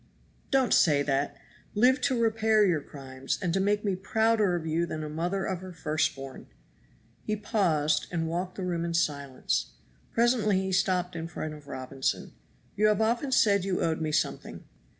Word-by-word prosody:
"Don't 265 -3 +3
say 145 -4 +4
that; 140 0 -1 0.4
live 255 +5 +4
to 260 -3 +1
repair 220 -1 +3
your 170 -6 +1
crimes 135 -2 -5
and 180 -4 -1
to 195 - +2
make 205 +2 +1
me 195 -2 +1
prouder 215 0 +2
of 165 -2 -4
you 165 +2 0
than 155 -1 -4
a 150 - -5
mother 175 +5 -2
of 185 -2 -2
her 185 0 -8
first 155 -3 -1
born." 135 -1 -9 0.8
He 215 - -1
paused 180 -9 +1
and 165 -2 -1
walked 180 +3 -3
the 190 - -5
room 175 -2 -1
in 170 0 -2
silence. 140 - -1 0.4
Presently 230 -4 +2
he 190 0 -2
stopped 185 -1 +1
in 165 0 -4
front 155 -2 -5
of 150 -1 -12
Robinson. 130 0 -3 0.4
"You 215 +1 +3
have 210 -1 +2
often 235 +5 +1
said 200 -6 +4
you 190 -1 -1
owed 160 -1 0
me 155 -1 -1
something." - - -2
180 Hz, 180 wpm, -28 LUFS, 155-210 Hz, 0.8 s, say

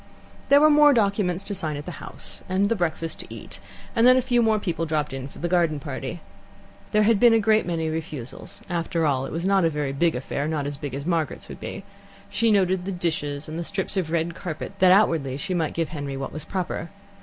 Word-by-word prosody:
There 280 - +8
were 305 +1 +6
more 295 -1 +7
documents 200 -4 +1
to 205 - -4
sign 160 -6 -2
at 145 - -7
the 175 -4 -8
house, - - -8
and 195 +2 +2
the 230 - +2
breakfast 165 -3 -2
to - - -10
eat, - - -9 0.4
and 230 +1 +5
then 255 0 +7
a - - +4
few 245 -1 +2
more 220 -1 +3
people 170 -5 -2
dropped 150 -2 -1
in 135 0 -5
for - - -15
the 175 - -2
garden 170 -4 +2
party. 135 +3 -5 0.7
There 215 -1 +4
had 215 -1 +4
been 240 0 +7
a - - +4
great 220 -1 +3
many 165 -2 -1
refusals, 155 -6 -6
and 175 -1 -1
after 165 -1 -1
all 135 -2 +1
it - - -8
was 170 +2 -3
not 195 -1 +3
a 165 - +4
very 145 -3 -2
big 165 +4 +2
affair 140 +3 -3
not 155 -3 -1
as 145 0 -3
big 140 -2 -6
as 140 +1 -5
Margaret's 165 -3 -1
would - - -8
be. - - -6 0.5
She 230 - +2
noted 190 -3 +2
the 195 - -2
dishes 155 -5 -2
and 155 +2 -5
the - - -2
strips 195 +3 -2
of 185 -5 -1
red 170 +1 0
carpet, 170 +1 -6
that 185 -1 +6
outwardly 165 -9 +3
she 185 +6 -3
might 165 -4 -1
give 165 -2 -1
Henry 145 -3 -5
what 135 - -5
was 155 0 -6
proper. 175 -2 -3
170 Hz, 240 wpm, -24 LUFS, 150-195 Hz, 0.7 s, There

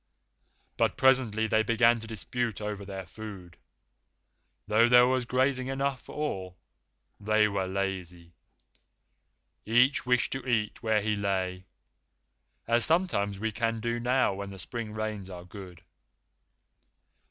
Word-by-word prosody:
But - - +1
presently 125 -5 +3
they 110 0 +2
began 115 +1 +3
to 115 - -9
dispute 115 +1 -3
over 105 -1 -4
their 95 -1 -7
food, 95 -3 -10 1.1
though 110 +3 +4
there 125 0 +7
was 130 -1 +1
grazing 130 +1 +1
enough 135 -1 -2
for - - -12
all. 95 -12 -4 0.6
They 105 +1 +3
were 100 -2 -2
lazy. 90 -3 -4 1.3
Each 125 +5 +3
wished 125 -1 +1
to 135 - -4
eat 115 -4 -1
where 110 -2 +1
he 105 0 0
lay, 95 -2 -2 1.0
as 120 +1 +3
sometimes 160 - +2
we 110 +2 -2
can 115 +1 -1
do 120 +1 -2
now 125 -2 +2
when 100 +1 -6
the 100 - -9
spring 115 +3 -5
rains 110 -3 -4
are 90 -1 -9
good. 90 -2 -11
110 Hz, 130 wpm, -28 LUFS, 100-120 Hz, 1.3 s, there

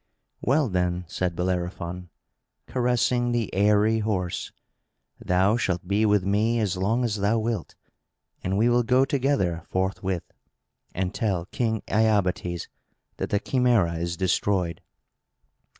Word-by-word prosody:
"Well 140 +2 +2
then," 90 -2 -1
said 90 0 -2
Bellerophon, 90 0 -3 0.6
caressing 120 -1 +1
the 115 -3 -1
airy 105 +3 +3
horse, 95 -5 -2 0.7
"thou 95 +5 +3
shalt 90 -6 -1
be 105 +3 +2
with 105 -3 +3
me 110 +4 +2
as 100 -4 0
long 105 +7 0
as 110 -3 0
thou 100 +3 +1
wilt; 110 -5 -3 0.7
and 95 +2 -1
we 110 +3 +3
will 120 0 +4
go 125 +3 +3
together, 135 - 0
forthwith, 95 -1 -1 0.7
and 95 +1 -1
tell 95 -8 -1
King 110 +1 -2
Iobates 100 -5 +1 0.5
that - - -3
the 100 - +1
Chimæra 115 -11 +2
is 85 0 -3
destroyed." 95 -2 0
100 Hz, 125 wpm, -25 LUFS, 90-115 Hz, 0.7 s, will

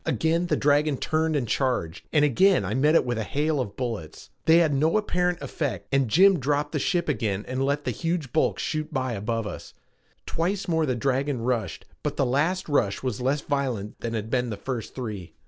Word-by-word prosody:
Again 165 +2 +1
the - - +2
dragon 145 0 +2
turned 160 +2 0
and 130 -5 0
charged, 115 - -1
and 150 -1 +4
again 185 - +4
I 100 - -2
met 150 +6 +3
it - - +4
with 120 -2 -1
a - - -1
hail 150 +5 0
of 105 -6 -3
bullets. 115 -11 -5
They 160 +1 +6
had 165 -4 +3
no 155 +8 +2
apparent 180 -4 0
effect 145 -5 -3
and 135 -2 +2
Jim 190 - +5
dropped 145 +2 0
the 150 - -1
ship 175 +4 0
again 105 -9 -1
and 130 +1 -1
let 140 +2 0
the - - 0
huge 165 -5 -3
bulk 155 - +2
shoot 155 -1 -3
by 130 -4 -1
above 115 +2 -2
us. 105 - -8 0.5
Twice 185 +5 -1
more 160 -2 +1
the 130 - 0
dragon 135 0 -1
rushed 115 -7 -2 0.2
but - - -3
the 135 - +2
last 155 +9 0
rush 120 -10 +1
was 125 -3 -2
less 135 +3 +1
violent 130 -9 -2
than 115 -1 -3
had 110 0 -4
been 125 -2 +1
the 105 - -4
first 120 +2 -5
three. 105 -9 -6
140 Hz, 210 wpm, -26 LUFS, 120-160 Hz, 0.5 s, They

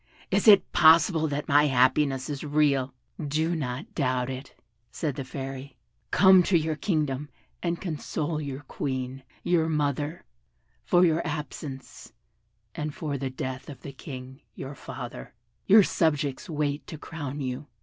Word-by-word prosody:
Is - - +2
it 205 -2 +7
possible 160 0 +5
that 145 0 -3
my 145 +1 +5
happiness 130 +1 +2
is 145 -2 -4
real?" 140 -3 +1 0.3
"Do 155 +4 0
not 130 -1 -4
doubt 130 -3 0
it," 130 +1 -9 0.3
said 150 +4 -2
the 135 +1 -5
Fairy, 135 +1 -7 0.3
"come 190 -1 +7
to 180 0 +3
your 160 -1 -1
kingdom 150 -5 -1 0.3
and 170 -1 -1
console 155 -2 -3
the 140 -2 -5
Queen, 130 -1 -3 0.2
your 165 -2 +2
mother, 150 +2 -1 0.6
for 180 -1 +4
your 165 -1 +2
absence, 150 -3 -6 0.6
and 150 -1 -4
for 150 -3 -3
the 135 0 -2
death 130 +1 -5
of 140 - -10
the 140 - -7
King, 130 0 -9
your 135 +1 -6
father: 125 -2 -8 0.3
your 210 +1 +8
subjects 150 -6 0
wait 150 -2 -2
to 160 - -7
crown 145 -2 -6
you." 130 +1 -4
145 Hz, 145 wpm, -27 LUFS, 135-160 Hz, 0.6 s, your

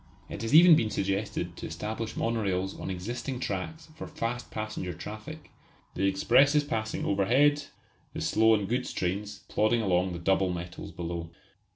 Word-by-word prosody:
It - - -6
has 115 +6 +1
even 170 0 +9
been 115 -7 +1
suggested 100 -3 -2
to - - -5
establish 110 +8 -5
monorails 95 -5 -1
on - - -5
existing 120 +8 -4
tracks 125 - -4
for 160 - -7
fast 120 +2 -4
passenger 110 -4 -4
traffic, 110 - -9 0.4
the 95 +2 +1
expresses 140 +9 +4
passing 110 -6 -3
overhead, 140 +9 +3 0.5
the - - -5
slow 110 0 +4
and 105 -2 -2
goods 125 +4 -1
trains 100 +3 -3
plodding 110 +2 +2
along 90 -1 +1
the - - -4
double 95 +2 +1
metals 90 0 -6
below. 85 -1 -5
105 Hz, 155 wpm, -28 LUFS, 95-120 Hz, 0.5 s, even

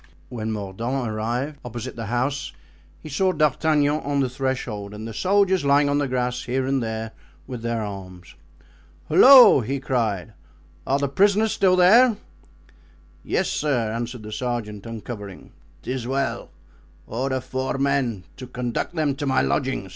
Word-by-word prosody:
When 110 -2 -4
Mordaunt 115 +5 -3
arrived 120 +7 -3
opposite 120 -2 -6
the 115 -2 -6
house 135 +5 -2 0.5
he - - -8
saw 185 +6 +1
D'Artagnan 150 -1 +2
on 140 -1 -2
the 135 -2 +1
threshold 125 -6 -3
and 110 +2 -7
the 115 - -7
soldiers 190 - +2
lying 140 +1 +3
on 145 0 +1
the 145 - 0
grass 125 -1 -2
here 130 +1 -1
and 135 0 0
there, 110 -1 -4 0.3
with 125 -3 -7
their 115 -1 -2
arms. 95 -3 -9 0.8
"Halloo!" 255 - +8
he 135 +5 -3
cried, 110 -6 -2 0.5
"are 135 - +2
the 140 0 0
prisoners 205 +8 +2
still 185 -1 +3
there?" 215 +6 +6 1.1
"Yes, - - 0
sir," 125 -7 -1
answered 120 0 -5
the 105 - -8
sergeant, 115 -3 -4
uncovering. 105 -3 -8 0.3
"'Tis 125 -2 -4
well; 130 -3 -2 0.6
order 130 +2 -2
four 130 +1 -3
men 135 -8 0
to 130 - -8
conduct 125 +6 -4
them 155 -3 +1
to 145 -1 -3
my 130 -1 +2
lodging." 130 -8 -1
130 Hz, 150 wpm, -23 LUFS, 115-145 Hz, 1.1 s, Halloo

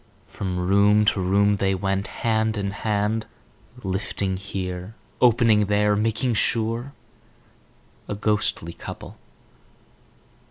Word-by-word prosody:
From 90 -2 -4
room 100 +3 +4
to 100 - +2
room 100 +2 +3
they 95 -1 +1
went, 95 +1 -1
hand 110 -1 0
in 100 -1 -2
hand, 105 +1 -1 0.6
lifting 95 0 -2
here, 95 +1 -5 0.3
opening 115 -3 +5
there, 105 0 +2
making 115 +4 0
sure—a 115 -1 -5
ghostly 105 -5 -1
couple. - - -9
105 Hz, 95 wpm, -24 LUFS, 95-110 Hz, 0.6 s, opening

